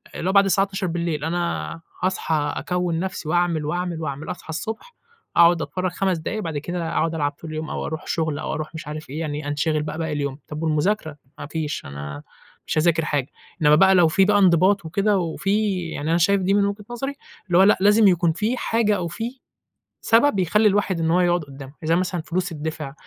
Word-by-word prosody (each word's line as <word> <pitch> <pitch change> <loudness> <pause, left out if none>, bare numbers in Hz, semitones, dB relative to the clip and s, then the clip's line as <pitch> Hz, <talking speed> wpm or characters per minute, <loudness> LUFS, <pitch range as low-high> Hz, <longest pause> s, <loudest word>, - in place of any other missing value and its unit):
اللي 180 - -2
هو - - 0
بعد 200 0 +6
الساعة 195 +1 +3
00:00 170 -6 -2
أنا 170 0 -2 0.2
هأصحى 160 -5 0
أكوّن 180 -2 -1
نفْسِي 180 -3 -4
وأعمل 175 -3 +1
وأعمل 175 +1 -2
وأعمل، 145 -1 -4
أصحى 180 - -10
الصبح، 220 - -5 0.4
أقعد 170 -1 +6
أتفرج 185 +2 -2
5 185 +1 0
دقايق 195 +7 -4
بعد 160 -6 -3
كده 170 +2 -3
أقعد 165 0 0
ألعب 145 -2 0
طول 160 +3 -11
اليوم 155 0 -5
أو - - -3
أروح 160 +2 -5
شغل 160 -3 -1
أو - - -3
أروح 155 +1 -5
مش 160 - -7
عارف 155 -1 -7
إيه، 145 +4 -5
يعني 150 -2 -4
أنشغِل 150 +1 0
بقى 150 0 -5
باقي 160 -1 -2
اليوم، 140 -1 -3
طَب 155 +1 -6
والمذاكرة؟! 155 0 0 0.2
ما - - -5
فيش 155 0 -4
أنا 70 +1 -7 0.4
مش - - -1
هأذاكر 165 0 +2
حاجة، 145 -4 -1 0.3
إنمّا 150 -1 +6
بقى 190 +4 +6
لو 175 -2 +6
في 190 +5 +3
بقى 205 +1 +4
انضباط 185 0 +4
وكده 200 +5 +1
وفي 195 +3 0
يعني 155 -1 -4
أنا 165 - +3
شايف 195 +3 +3
دي 190 +2 +1
من 200 0 +3
وجهة 200 +1 -4
نظري، 270 +4 -4 0.3
اللي 175 -2 +3
هو 190 - +7
لأ 205 - +5
لازم 210 +1 +6
يكون 175 -3 +3
في 215 +9 -1
حاجة 225 -3 +1
أو 175 -2 -2
في 230 +9 -5 0.6
سبب 230 -1 +3
يخلّي 210 +5 +3
الواحد 200 -3 0
إن 160 0 +1
هو 180 +2 +3
يقعد 175 -2 +2
قدامه، 135 -1 -11
زي 165 +1 +2
مثلًا 180 -1 -1
فلوس 180 +2 -2
تدِّفع 155 -3 -5
170 Hz, 210 wpm, -23 LUFS, 155-195 Hz, 0.6 s, هو